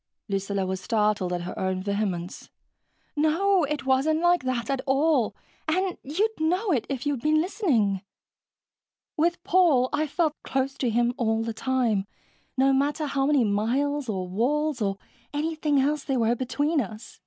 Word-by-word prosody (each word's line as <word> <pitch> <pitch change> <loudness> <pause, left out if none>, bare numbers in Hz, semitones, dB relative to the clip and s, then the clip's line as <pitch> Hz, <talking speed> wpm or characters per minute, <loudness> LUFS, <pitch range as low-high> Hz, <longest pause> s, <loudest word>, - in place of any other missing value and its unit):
Lucilla 195 -1 -1
was 190 0 -3
startled 210 -4 +1
at 175 -1 -2
her 180 - -6
own 190 0 -1
vehemence. 200 -3 -3 0.7
"No, 335 +4 +3
it 285 -1 -3
wasn't 270 +4 +2
like 350 +1 +3
that 250 -2 -1
at 270 -2 -1
all, 270 -3 +2 0.3
and 365 +3 0
you'd 405 +10 -1
know 365 +6 +1
it, 255 -8 0
if 270 -2 -3
you'd 285 -4 -1
been 305 +3 +3
listening. 285 - +1 1.1
With 340 +3 0
Paul, 340 -9 +4
I 305 +1 +1
felt 310 0 -1
close 265 0 -1
to 250 - +1
him 240 +2 +2
all 225 -1 +1
the 230 0 -3
time, 225 -5 0 0.5
no 270 +1 +4
matter 290 +3 +1
how 275 -1 0
many 290 -4 +4
miles 250 +7 0
or 185 -3 -2
walls 270 +8 0
or 195 -2 0 0.4
anything 305 -1 0
else 290 +2 +1
there 270 -2 -1
were 230 0 +2
between 290 +5 0
us. 215 +1 -9
270 Hz, 160 wpm, -26 LUFS, 220-310 Hz, 1.1 s, Paul